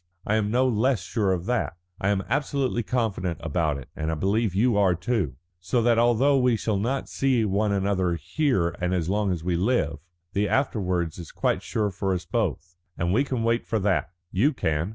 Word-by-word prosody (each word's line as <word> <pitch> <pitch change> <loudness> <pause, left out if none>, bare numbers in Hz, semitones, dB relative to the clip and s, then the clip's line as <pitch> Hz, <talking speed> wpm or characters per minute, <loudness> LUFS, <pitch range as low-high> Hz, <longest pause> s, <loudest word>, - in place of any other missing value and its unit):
I 105 - 0
am 110 -1 +1
no 125 +4 +3
less 120 -2 +1
sure 100 -2 0
of 90 -1 -1
that. 120 -8 -1 0.2
I 100 - 0
am 100 -1 +1
absolutely 135 -4 0
confident 100 -7 -1
about 80 -2 0
it, 70 - -9
and 80 0 -2
I - - -1
believe 100 +4 0
you 115 +3 +3
are 95 -3 +3
too. 90 - -1 0.2
So 90 +8 0
that 120 -1 +4
although 120 +4 +4
we 125 -2 +3
shall 110 -2 -1
not 130 +6 -1
see 130 -5 +1
one 105 +1 +1
another 95 -3 +1
here 90 - 0
and 90 +1 +1
as 85 -1 -1
long 100 0 +1
as 85 -3 -3
we 90 0 0
live, 90 - +1 0.4
the 100 0 +1
afterwards 90 - 0
is 85 - -8
quite - - 0
sure 100 +2 -1
for 95 0 -1
us 90 - -5
both. 90 - -2 0.2
And 85 +2 0
we 130 +7 +3
can 130 -5 -2
wait 115 +1 +1
for 110 - 0
that. 95 -7 +1 0.2
You 130 +12 +2
can. 80 - -1
100 Hz, 205 wpm, -25 LUFS, 90-120 Hz, 0.4 s, that